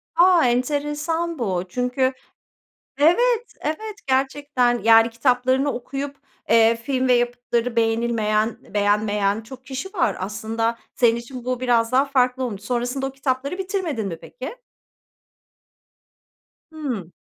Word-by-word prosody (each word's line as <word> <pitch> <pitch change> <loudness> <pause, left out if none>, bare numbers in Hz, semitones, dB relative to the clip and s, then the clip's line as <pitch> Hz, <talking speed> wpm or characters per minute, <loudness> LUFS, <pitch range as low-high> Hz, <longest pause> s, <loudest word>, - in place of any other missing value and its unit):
A! 345 -2 +5
Enteresan 295 +6 -1
bu 185 -6 -1
çünkü 250 +3 0 0.9
Evet, 470 +10 +3
evet, 415 +8 -4
gerçekten, 265 -2 +1
yani 225 0 +6
kitaplarını 255 +3 +1
okuyup, 275 +3 -5 0.3
eee, 230 0 +5
film 260 +2 -1
ve 250 - +5
yapıtları 240 0 0
beğenilmeyen, 225 -1 +1 0.2
beğenmeyen 205 0 +1
çok 260 +3 -12
kişi 275 +9 -5
var. 290 - +1
Aslında, 220 +4 -2 0.2
senin 235 -2 +3
için 240 +1 -8
bu 255 0 -2
biraz 240 -1 +2
daha 265 +2 +4
farklı 260 -2 +1
olmuş. 210 -5 -5
Sonrasında 245 +3 -2
o - - -3
kitapları 270 +4 -2
bitirmedin 370 - -2
mi 165 -3 -5
peki? - - -8 2.2
Hıı. 250 - -5
250 Hz, 120 wpm, -22 LUFS, 230-280 Hz, 2.2 s, yani